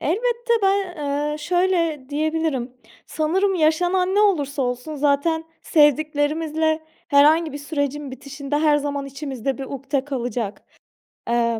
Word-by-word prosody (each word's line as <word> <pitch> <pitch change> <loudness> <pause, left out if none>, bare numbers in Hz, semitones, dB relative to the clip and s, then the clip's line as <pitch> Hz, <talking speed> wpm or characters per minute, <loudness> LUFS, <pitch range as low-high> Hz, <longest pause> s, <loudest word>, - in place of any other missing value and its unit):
elbette, 470 +7 0
ben, 390 -2 +1
ııı, 295 0 -2
şöyle 335 -3 0
diyebilirim: 305 -4 -1 0.3
Sanırım 380 +6 +1
yaşanan 355 +3 +2
ne 415 - +4
olursa 290 -9 +2
olsun 250 +4 -3
zaten 295 +3 +1 0.2
sevdiklerimizle 310 +1 +2 0.3
herhangi 310 +2 +5
bir 290 - -5
sürecin 285 -1 -3
bitişinde 280 +2 -4
her 300 -1 +4
zaman 285 -1 -2
içimizde 270 -2 -4
bir 270 - -4
ukde 275 0 -3
kalacak. 245 -6 -3 0.7
Eee. 235 -1 +1
295 Hz, 120 wpm, -22 LUFS, 275-325 Hz, 0.7 s, herhangi